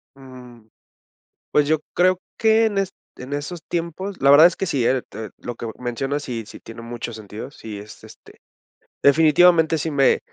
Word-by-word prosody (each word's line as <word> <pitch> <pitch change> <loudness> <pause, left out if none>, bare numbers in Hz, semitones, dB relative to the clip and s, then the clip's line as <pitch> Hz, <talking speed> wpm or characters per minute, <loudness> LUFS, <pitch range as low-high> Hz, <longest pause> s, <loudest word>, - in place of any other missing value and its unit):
Mm. 125 -4 -14 0.8
Pues 145 -1 +3
yo 155 +1 +3 0.2
creo 185 0 +3 0.2
que 225 0 +4
en 205 -2 -1
est 195 -1 -1 0.2
en 130 +2 -9
esos 150 +4 -5
tiempos 175 +4 -4
la 135 - +4
verdad 145 +3 +9
es 175 - -4
que 195 - -2
sí, 135 -8 0
eh, 130 +1 +2
te 110 -1 -8
lo 120 - -7
que 115 - -6
mencionas 135 +4 -3
sí, 120 -4 -5
sí - - -12
tiene 115 +1 -11
mucho 120 0 -6
sentido, 110 +1 -8
sí 110 -6 -9
es 105 +1 -13
este - - -16 0.6
definitivamente 160 +2 +5
sí 160 +1 -3
me 140 -2 +3
140 Hz, 180 wpm, -22 LUFS, 120-170 Hz, 0.8 s, verdad